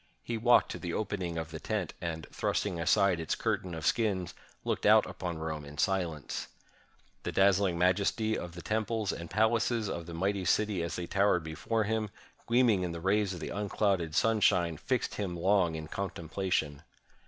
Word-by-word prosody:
He 120 - -3
walked 120 +2 +4
to - - -5
the 85 -2 -4
opening 95 -5 -2
of 80 -1 -4
the 80 - -6
tent, 105 -5 -2
and, 80 -2 -4
thrusting 95 -5 -1
aside 85 +2 +3
its 80 - -1
curtain 90 -2 -2
of 80 -1 -5
skins, 100 -5 +1 0.3
looked - - 0
out - - +7
upon 85 -3 -5
Rome 80 -1 -4
in 75 +1 -11
silence. 85 -6 -1 0.7
The - - -3
dazzUng 95 -2 +3
majesty 100 +5 +2
of 85 -1 -6
the 90 - -8
temples 110 -1 -1
and 85 - -6
pal 110 +3 +3
aces 115 -1 0
of 85 -1 -5
the 85 - -7
mighty 95 +3 0
city 105 -1 +2
as 85 - -3
they 90 - -3
towered 95 -1 +2
before 110 +8 -1
him, 110 0 -1 0.4
gleaming 115 -5 +4
in 90 -2 -2
the 85 - -5
rays 95 +2 +1
of 85 - -8
the - - -4
unclouded 100 -5 0
sunshine, 100 -7 +3
fixed - - -1
him 95 -4 -3
long 90 -2 +2
in 80 -1 -6
contemplation. 85 -4 -2
95 Hz, 180 wpm, -31 LUFS, 85-105 Hz, 0.7 s, out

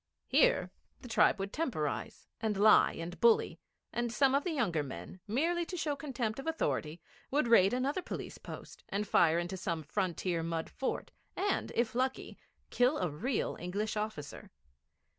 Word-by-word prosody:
Here - - +3 0.3
the 250 - -9
tribe 225 - +4
would 195 0 -4
temporise, 230 - -2 0.2
and 215 -3 0
lie 215 +2 +6
and 170 +1 -6
bully, 235 -1 +4 0.3
and 240 -1 -1
some 270 +2 +3
of 280 +1 +3
the - - -2
younger 215 - 0
men, 130 - -8
merely 330 +10 +1
to 360 - -5
show 300 -3 -1
contempt 260 -5 -3
of 270 - -7
authority, 170 - -1 0.3
would 285 -2 +1
raid 200 -4 +6
another 270 +8 0
police - - -6
post - - -10
and 205 +1 -2
fire 165 -2 +4
into 175 +2 -2
some 170 -3 -3
frontier 175 +1 -1
mud 165 0 -3
fort, 270 - -3 0.2
and, 400 0 0
if 235 -1 +1
lucky, 260 +2 -1 0.4
kill 250 +4 +3
a 180 -4 -1
real 230 - -1
English 205 +5 -2
officer. 210 -9 -5
220 Hz, 160 wpm, -32 LUFS, 175-270 Hz, 0.4 s, lie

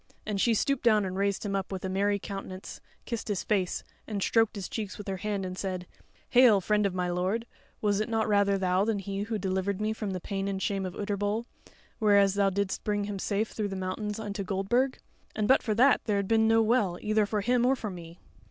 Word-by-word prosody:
And 205 -2 -1
she 235 -2 +3
stooped 275 +4 +1
down 215 -4 +4
and 185 0 -4
raised 200 +1 0
him 200 -1 -1
up, 195 0 -2
with 190 -1 -4
a - - 0
merry 200 +2 +1
countenance 195 -1 -7 0.2
kissed 235 -3 -4
his 205 -4 -1
face, 190 -4 0 0.2
and 205 -3 -2
stroked 225 -2 +2
his 195 -3 -4
cheeks 210 -3 -5
with 205 - -9
her 195 -1 -2
hand 200 0 -2
and 185 0 -5
said: 185 -2 -4 0.4
"Hail, 245 -5 +6
friend 210 +2 +2
of 185 - -5
my 180 -1 0
lord! 185 +6 -1 0.4
Was 205 -1 +2
it 215 - -1
not 225 -1 +1
rather 200 -1 +3
thou 185 0 +2
than 220 0 0
he 195 0 -4
who 220 +1 -2
delivered 190 0 -1
me 215 +1 0
from 215 -2 -4
the 185 -1 -3
pain 195 +2 -3
and 195 -1 -2
shame 195 -1 -1
of 180 - -8
Utterbol, 205 +2 -1 0.5
whereas 200 -3 +5
thou 200 -1 +3
didst 200 0 -2
bring 205 -1 0
him 200 -1 -4
safe 210 +3 -1
through 210 -2 -2
the 195 - -5
mountains 195 +3 -3
unto 205 -2 -4
Goldburg? 200 +8 0 0.4
And 215 -1 0
but 265 - +5
for 215 -3 -1
that 255 +4 +5
there 210 -3 +1
had 200 -1 -1
been 220 0 +3
no 225 0 +5
Well, 215 -6 +2
either 215 -1 +1
for 210 0 -1
him 245 +3 +2
or 260 +2 +4
for 215 -5 -5
me." 170 -1 -10
205 Hz, 235 wpm, -29 LUFS, 195-215 Hz, 0.5 s, Hail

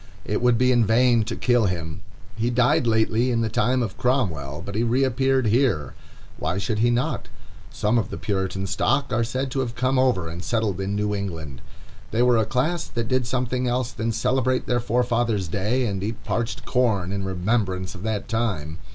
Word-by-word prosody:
It - - -1
would 125 -1 +4
be 125 +1 +3
in 120 -2 +4
vain 115 +1 +4
to - - -3
kill 120 -4 +2
him. 80 -4 -4 0.3
He 115 +1 0
died 125 0 +3
lately 110 +2 +2
in 115 -2 +1
the 110 - 0
time 125 +3 +1
of 105 -5 -5
Cromwell, 85 - -1
but 100 - -6
he 110 - 0
reappeared 130 +2 +2
here. 110 - +1 0.4
Why 85 +4 -2
should 105 +2 -1
he 120 +2 +3
not? 120 +1 -1 0.4
Some 110 +3 +1
of 110 - -2
the - - -5
Puritan 95 +2 -2
stock 125 +7 0
are 115 +1 +2
said 130 +3 -2
to 135 - -1
have 120 -3 -2
come 130 +1 +1
over 125 -10 +2
and 85 +2 -6
settled 110 -5 -1
in 100 +1 -2
New 105 0 0
England. 80 -10 -5 0.5
They 115 +2 +1
were 125 -1 +4
a 110 - +2
class 155 +9 0
that 115 -2 -3
did 130 -2 +1
something 125 0 -1
else 125 0 0
than 115 +1 -2
celebrate 125 +2 +1
their 120 0 +1
forefathers' 120 -4 0
day, 105 +9 0
and 100 -4 -2
eat 110 +3 -4
parched 115 0 -3
corn 110 -8 +1
in 100 0 -2
remembrance 95 -1 -1
of 90 - -10
that 110 -1 -2
time. 95 -10 -2
115 Hz, 195 wpm, -24 LUFS, 100-125 Hz, 0.5 s, would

